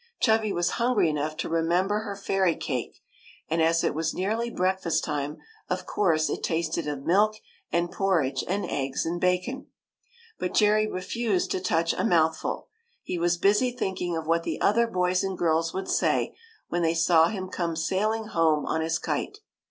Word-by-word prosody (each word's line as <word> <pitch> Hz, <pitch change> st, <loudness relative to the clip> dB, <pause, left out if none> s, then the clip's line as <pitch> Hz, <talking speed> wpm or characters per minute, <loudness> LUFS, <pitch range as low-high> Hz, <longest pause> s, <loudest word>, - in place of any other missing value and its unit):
Chubby 220 Hz, -2 st, +2 dB
was 175 Hz, -1 st, 0 dB
hungry 235 Hz, -9 st, +3 dB
enough 150 Hz, +1 st, -3 dB
to 165 Hz, -, -2 dB
remember 175 Hz, +5 st, +1 dB
her 205 Hz, -2 st, -5 dB
fairy 195 Hz, -3 st, +1 dB
cake; 125 Hz, -5 st, -4 dB, 0.5 s
and 165 Hz, +1 st, 0 dB
as 165 Hz, +1 st, +3 dB
it -, -, +1 dB
was 160 Hz, +1 st, -2 dB
nearly 220 Hz, +5 st, -1 dB
breakfast 185 Hz, -4 st, 0 dB
time, 150 Hz, 0 st, -3 dB, 0.3 s
of -, -, -2 dB
course 160 Hz, -6 st, +1 dB
it -, -, -3 dB
tasted 165 Hz, -1 st, -1 dB
of 145 Hz, -2 st, -4 dB
milk 210 Hz, +6 st, +3 dB, 0.4 s
and 170 Hz, 0 st, 0 dB
porridge 155 Hz, -10 st, +1 dB
and 195 Hz, +3 st, -1 dB
eggs 135 Hz, -1 st, -2 dB
and 175 Hz, +1 st, -2 dB
bacon. 180 Hz, +9 st, 0 dB, 0.7 s
But 180 Hz, -, -3 dB
Jerry 215 Hz, 0 st, +4 dB
refused 205 Hz, 0 st, -1 dB
to -, -, 0 dB
touch 165 Hz, -2 st, +1 dB
a -, -, -2 dB
mouthful. 160 Hz, -7 st, +1 dB, 0.4 s
He 175 Hz, -, -3 dB
was 175 Hz, 0 st, +2 dB
busy 210 Hz, +8 st, +3 dB
thinking 190 Hz, -8 st, -3 dB
of 160 Hz, -, -4 dB
what 165 Hz, +1 st, +2 dB
the -, -, -4 dB
other 230 Hz, +3 st, +3 dB
boys 180 Hz, -2 st, +1 dB
and 190 Hz, -1 st, -3 dB
girls 165 Hz, 0 st, +1 dB
would 190 Hz, -, -3 dB
say, -, -, +1 dB, 0.3 s
when 175 Hz, -, -1 dB
they 165 Hz, 0 st, +2 dB
saw 165 Hz, -1 st, +5 dB
him 190 Hz, -1 st, -4 dB
come 170 Hz, -3 st, -2 dB
sailing 210 Hz, +7 st, 0 dB
home 165 Hz, -7 st, +2 dB
on 160 Hz, -, -1 dB
his 165 Hz, +1 st, 0 dB
kite. 410 Hz, -, -3 dB
175 Hz, 175 wpm, -26 LUFS, 165-200 Hz, 0.7 s, saw